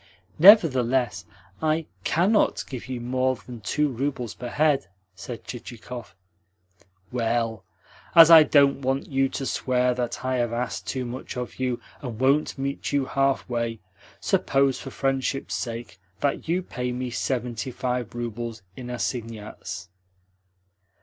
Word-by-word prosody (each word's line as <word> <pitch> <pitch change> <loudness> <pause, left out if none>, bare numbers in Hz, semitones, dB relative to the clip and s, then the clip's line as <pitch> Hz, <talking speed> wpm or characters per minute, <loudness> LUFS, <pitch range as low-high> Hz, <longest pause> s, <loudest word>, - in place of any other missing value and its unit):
"Nevertheless, 130 - +6 0.4
I 160 0 +1 0.2
CANNOT 195 +6 +2
give 130 -3 -7
you 125 -1 -4
more 130 +2 0
than 120 -1 -10
two 150 +9 +1
roubles 130 -3 -3
per 125 - -7
head," 145 -6 +2 0.3
said 115 +5 -8
Chichikov. 120 -2 -8 1.0
"Well, 115 -3 -1 0.5
as 165 0 +10
I 165 -1 +11
don't 140 -2 +4
want 135 +1 0
you 135 0 +2
to 135 - -4
swear 125 -1 +1
that 125 0 -3
I 130 0 +1
have 120 -1 0
asked 120 +2 -3
too 130 -2 -2
much 125 +1 -6
of 125 +1 -5
you 125 -2 -1 0.2
and 120 -5 -6
won't 140 +4 +2
meet 140 +1 -3
you 140 -2 +1
halfway, 120 -4 0 0.4
suppose, 135 -1 +2
for 135 - -7
friendship's 135 0 -1
sake, 115 -4 -5 0.2
that 140 +2 -1
you 180 +2 +1
pay 125 -7 -4
me 125 0 -3
seventy 125 -1 -2
five 125 -2 -3
roubles 115 -2 -5
in 125 -1 -8
assignats?" 115 -5 -5
125 Hz, 135 wpm, -25 LUFS, 120-135 Hz, 1.0 s, I